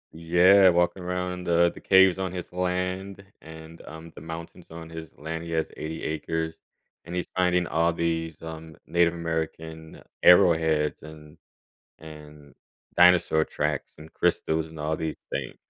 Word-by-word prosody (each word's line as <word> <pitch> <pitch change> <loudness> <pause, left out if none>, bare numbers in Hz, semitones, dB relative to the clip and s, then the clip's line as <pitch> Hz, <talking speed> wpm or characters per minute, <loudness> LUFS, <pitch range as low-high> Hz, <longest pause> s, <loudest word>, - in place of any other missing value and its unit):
Yeah, 90 +4 +5
walking 90 +1 +1
around 90 0 -4
the 85 0 +3
the - - -13
caves 95 -1 +5
on 95 -2 -2
his 90 -1 -7
land 90 +2 -3 0.2
and, 80 +1 -12
um, 80 +1 -10
the - - -12
mountains 80 +2 -9
on 80 0 -9
his 80 -2 -10
land- 80 +2 -5
he 85 - -8
has 80 -1 -1
80 80 +1 -6
acres- 80 +1 -3 0.5
and 85 +2 -8
he's 90 - -2
finding 90 -1 +2
all 85 0 +1
these, 80 -1 -2
um, 80 -1 -9
Native 85 0 +2
American 80 -1 -5 0.2
arrowheads 80 -4 +4
and 75 0 -13 0.6
and 75 -2 -13 0.4
dinosaur 85 -3 +5
tracks 75 -2 -3
and 80 +1 -12
crystals 80 0 0
and 80 -1 -11
all 80 +1 -1
these 80 -1 -4
things. 70 -2 -4
80 Hz, 150 wpm, -26 LUFS, 80-90 Hz, 0.6 s, Yeah